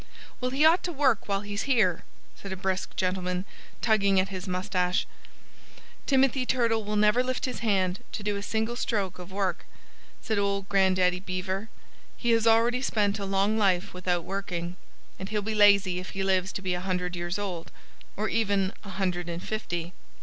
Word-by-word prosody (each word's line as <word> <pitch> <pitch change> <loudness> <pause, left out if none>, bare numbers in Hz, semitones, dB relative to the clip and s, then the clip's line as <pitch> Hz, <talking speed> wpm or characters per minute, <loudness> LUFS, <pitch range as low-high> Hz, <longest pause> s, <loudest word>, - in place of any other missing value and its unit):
"Well, 250 - 0
he 275 +4 +3
ought 330 +3 +6
to 355 - -2
work 270 -8 +2
while 200 -1 0
he's 205 0 -4
here," 200 -10 +3 0.3
said 195 - -9
a - - -2
brisk 190 0 -2
gentleman, 180 0 -1 0.4
tugging 200 -4 +4
at 185 - +1
his 190 0 -6
moustache. 180 -1 0 1.0
"Timothy 270 -1 +3
Turtle 230 -3 +1
will 210 +1 -3
never 210 +3 +4
lift 255 0 -2
his 255 - -4
hand 190 -5 +1
to 210 - -4
do 205 0 0
a 200 - -3
single 220 +3 -1
stroke 195 -7 -2
of 180 +1 -9
work," 190 -3 -1 0.6
said 220 -2 -1
old 200 -1 0
Grandaddy 185 -2 +3
Beaver. 185 +3 -3 0.5
"He 240 - +1
has 230 0 +3
already 230 +2 +4
spent 210 -5 +1
a 200 - -3
long 195 +3 +1
life 190 -3 +2
without 180 -1 -1
working. 180 -2 -4 0.4
And 190 +1 -5
he'll 210 -1 -1
be 220 +2 -2
lazy 200 -3 +5
if 185 - -7
he 195 - 0
lives 190 0 +1
to 190 - -5
be 185 -1 0
a 180 - -2
hundred 180 -1 -2
years 175 +1 -3
old 185 -5 -5 0.5
or 215 +2 0
even 200 -3 +1
a 200 - -9
hundred 180 -3 -2
and 170 +1 -5
fifty." 175 -5 -4
195 Hz, 185 wpm, -27 LUFS, 185-220 Hz, 1.0 s, ought